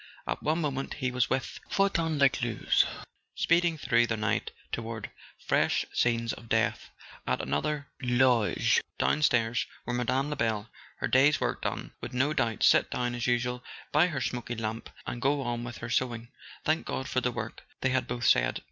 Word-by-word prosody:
At - - -3
one 160 +3 +1
moment 140 -3 -2
he 130 -3 -1
was 125 0 +1
with 130 - -2
Fortin 170 -6 +1
Lescluze, 125 -5 +3 0.5
speeding 170 -1 +2
through 120 -4 +3
the 115 - -1
night 105 -1 0 0.2
toward 115 -2 -4 0.3
fresh - - +2
scenes 115 -1 +1
of 115 - -11
death; - - +1 0.4
at 65 - +1
another, 150 -1 -1
in 125 -2 0
the 130 - +6
loge 120 -5 +3 0.2
down¬ 150 - +2
stairs, 115 -3 +2 0.2
where 120 - -2
Mme. 130 +3 0
Lebel, 115 -5 -1 0.3
her - - -1
day's 140 +4 +5
work - - -1
done, - - -3
would 125 - -6
no 140 +4 +2
doubt 115 -7 0
sit - - +5
down 125 -1 -1
as 120 0 -2
usual 125 0 0 0.3
by 155 +4 +5
her 150 -6 -3
smoky 120 -1 -3
lamp 110 0 -4 0.2
and 120 - -5
go 140 +1 +2
on 120 -1 -2
with 120 0 -6
her 115 - -6
sewing. 120 -2 -1 0.4
"Thank 155 +1 +1
God 130 - -3
for 130 - 0
the 125 - 0
work - - -5
" - - -33
they 135 - +2
had 130 0 0
both 120 -1 -3
said. - - +4
125 Hz, 185 wpm, -29 LUFS, 115-140 Hz, 0.5 s, the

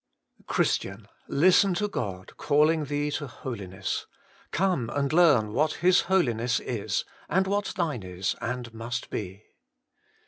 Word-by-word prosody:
Christian! 100 +2 0 0.2
listen 185 +5 +4
to 210 +3 0
God 95 - -5
calling 150 +2 +2
thee 145 +1 -1
to 145 0 -3
Holiness. 115 -8 -5 0.4
Come 175 -11 0
and 140 +2 -1
learn 145 -12 +5
what 155 +6 +2
His 180 +1 +4
Holiness 120 -10 +2
is, 110 -5 -2 0.2
and 190 +4 +2
what 200 +1 -1
thine 155 - -1
is 95 0 -3
and 120 -1 -4
must 115 +2 -5
be. 100 0 -5
130 Hz, 130 wpm, -27 LUFS, 110-170 Hz, 0.4 s, learn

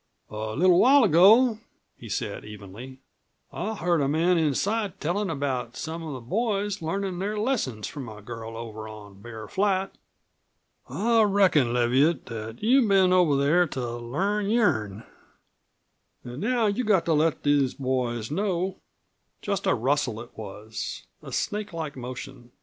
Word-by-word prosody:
"A 110 0 -4
little 180 +2 +5
while 275 +2 +6
ago," 215 +6 +6 0.4
he 115 - -11
said 105 -1 -3
evenly, 105 +6 -10 0.5
"I 220 +1 -3
heard 170 -4 +1
a 140 - +1
man 165 +5 +2
inside 195 - -1
tellin' 185 +5 -1
about 130 -5 -3
some 165 +1 -5
of 160 -3 -6
the 130 - -7
boys 205 - -1
learnin' 185 +2 -3
their 205 +3 -2
lessons 210 - -1
from 135 -5 -7
a 105 -1 -10
girl 115 +1 -8
over 110 -2 -7
on 105 -2 -12
Bear 110 -1 -9
Flat. 195 -1 0 1.0
I 230 +2 +2
reckon, 195 - +3
Leviatt, 130 +6 +2
that 115 - -7
you've 250 +1 +4
been 190 -2 +4
over 175 -6 +4
there 160 +6 +3
to 120 -4 -4
learn 195 - -1
your'n. 110 - +1 1.2
An' 120 +2 -7
now 235 +4 +1
you've 210 +3 0
got 190 -6 +3
to 165 - +2
let 155 +1 +1
these 145 -3 +2
boys 125 -3 -2
know 190 +1 -1 0.3
!" - - -48
Just 200 -2 -2
a - - +3
rustle 130 -1 0
it 120 - -11
was 110 +1 -7 0.2
a - - -10
snake 210 -2 -3
like 160 -3 -5
motion. 125 0 -8
155 Hz, 155 wpm, -26 LUFS, 120-200 Hz, 1.2 s, while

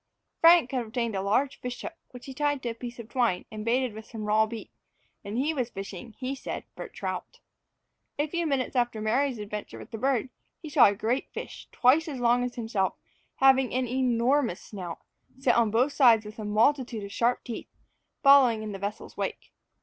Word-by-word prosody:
Frank 330 -6 +6
had 255 -3 -1
obtained 230 -1 -2
a 190 - -1
large 255 +8 0
fish 250 0 -5
hook, - - -6 0.2
which 250 -1 -12
he 270 - -7
tied 290 0 -1
to 240 - -1
a - - -3
piece 240 +1 -8
of 235 -2 -9
twine, 235 -7 0
and 215 -1 -6
baited 245 +1 +1
with 220 +1 -10
some 220 -2 -7
raw 215 +1 +3
beef; 225 0 -8 0.5
and 205 +3 -5
he 290 +5 +1
was 250 -5 -2
fishing, 195 +2 -8
he 260 0 -3
said, 270 - -5
for - - -6
trout. - - -6 0.8
A 295 - +1
few 340 +2 -2
minutes 270 -3 -1
after 240 -3 +1
Mary's 245 +4 +1
adventure 210 0 -6
with - - -11
the 225 - -6
bird, 260 0 +1 0.3
he 315 - -8
saw 295 -4 +7
a 200 - +1
great 230 +6 -1
fish, - - -8
twice 280 +6 +4
as 280 -5 -5
long 245 +1 +3
as 250 0 -4
himself, 220 -5 -1 0.4
having 265 -1 +4
an 255 -1 0
enormous 250 -2 +1
snout, 180 -5 -7 0.4
set 265 -2 +2
on 235 -2 +3
both 250 +7 +2
sides 230 -6 +5
with 210 +1 -10
a 215 - -4
multitude 230 +1 +1
of 200 - -7
sharp 240 +4 +1
teeth, 235 - -6 0.6
following 265 -6 +6
in 215 - -5
the 195 - -6
vessel's 200 +2 -5
wake. - - -4
240 Hz, 205 wpm, -27 LUFS, 220-265 Hz, 0.8 s, saw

